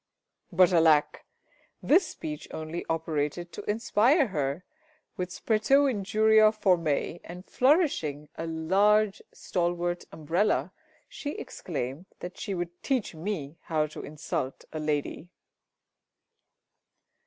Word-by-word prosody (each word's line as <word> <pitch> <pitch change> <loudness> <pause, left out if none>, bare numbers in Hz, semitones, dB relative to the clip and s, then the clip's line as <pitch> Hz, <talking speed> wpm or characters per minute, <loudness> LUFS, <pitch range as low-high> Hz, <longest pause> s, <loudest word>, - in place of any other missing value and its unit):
But 185 +1 +5
alack! 160 -3 +3 0.6
this 345 +3 +4
speech 150 -1 -7
only 160 +2 -5
operated 165 +1 -2
to - - -7
inspire 230 +6 +3
her 150 0 -2 0.5
with 180 0 -3
spretæ 250 +9 +2
injuria 215 +1 +4
formæ, 175 -6 +1
and 180 +2 -10
flourishing 255 - +1
a 165 - -5
large 195 +6 +2
stalwart 175 -1 -2
umbrella, 165 0 0 0.4
she 290 0 -6
exclaimed 145 +1 -5
that 180 +1 -8
she 200 - -3
would 175 0 -5
teach 260 -9 -1
me 160 -3 -5
how 155 -2 +1
to 155 - -8
insult 145 -3 -4
a 155 - -3
lady. 150 +2 -2
175 Hz, 110 wpm, -28 LUFS, 155-210 Hz, 0.6 s, But